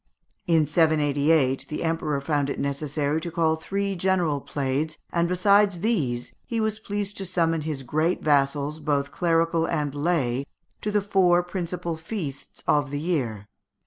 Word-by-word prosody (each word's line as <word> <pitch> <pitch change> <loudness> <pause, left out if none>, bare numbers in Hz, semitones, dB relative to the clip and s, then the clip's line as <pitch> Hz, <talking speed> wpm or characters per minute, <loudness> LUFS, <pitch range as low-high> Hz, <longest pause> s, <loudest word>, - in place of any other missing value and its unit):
In 165 -3 +4
788, 150 -3 +2
the 150 - -3
emperor 160 -3 0
found 145 -1 0
it - - -3
necessary 145 +2 -1
to 170 - -4
call 160 -1 +2
three 195 +5 -2
general 175 -5 +1
plaids, 145 +3 -2
and, 170 0 +1
besides 200 0 +3
these, 145 - 0
he 230 - -1
was 220 -1 -1
pleased 205 -1 -3
to 195 - -4
summon 165 -3 +1
his 150 -3 -4
great 155 +7 0
vassals, 145 +1 +1
both 145 -2 0
clerical 165 -1 +1
and 150 -4 -1
lay, 145 -4 0 0.3
to 210 - -2
the 210 -1 +1
four 180 -3 +3
principal 175 -1 -4
feasts 160 -5 -6
of 145 -1 +2
the 145 +1 -3
year. 130 - -2
160 Hz, 150 wpm, -25 LUFS, 145-175 Hz, 0.3 s, In